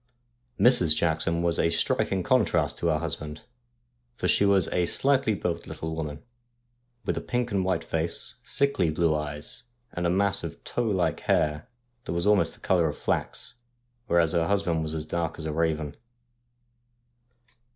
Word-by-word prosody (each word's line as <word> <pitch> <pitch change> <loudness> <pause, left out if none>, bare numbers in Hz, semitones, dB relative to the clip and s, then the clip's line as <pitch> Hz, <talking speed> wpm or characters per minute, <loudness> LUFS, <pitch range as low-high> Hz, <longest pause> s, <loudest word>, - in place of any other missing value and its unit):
Mrs. 90 -11 +5
Jackson 85 +1 +1
was 85 -1 +2
a 85 - +3
striking 90 +3 +1
contrast 125 +2 +2
to 85 - 0
her 80 -2 +2
husband, 75 -1 -5 0.7
for - - -2
she 100 - +4
was 100 -3 +4
a 90 -1 +1
slightly 135 -6 +2
built 85 -3 -3
little 80 0 -5
woman, 75 -2 -5 0.8
with - - -1
a - - -2
pink 125 -1 -2
and 100 -2 +1
white 90 -3 0
face, 80 +1 -2
sickly 140 - +1
blue 80 0 +1
eyes, 75 +4 -4 0.3
and 85 0 -1
a - - +1
mass 100 +2 +1
of 85 -1 -7
tow 120 - -2
like 95 -5 0
hair 75 -1 0 0.4
that - - -3
was 85 0 -1
almost 105 -1 +3
the - - -20
colour 85 -4 +2
of - - -6
flax, - - -2 0.5
whereas 85 -1 +3
her 85 -1 +2
husband 95 -5 +1
was 80 0 -3
as 80 -1 -3
dark 80 0 -2
as 80 - -6
a 80 - -2
raven. 80 -2 -1
85 Hz, 165 wpm, -27 LUFS, 80-95 Hz, 0.8 s, Mrs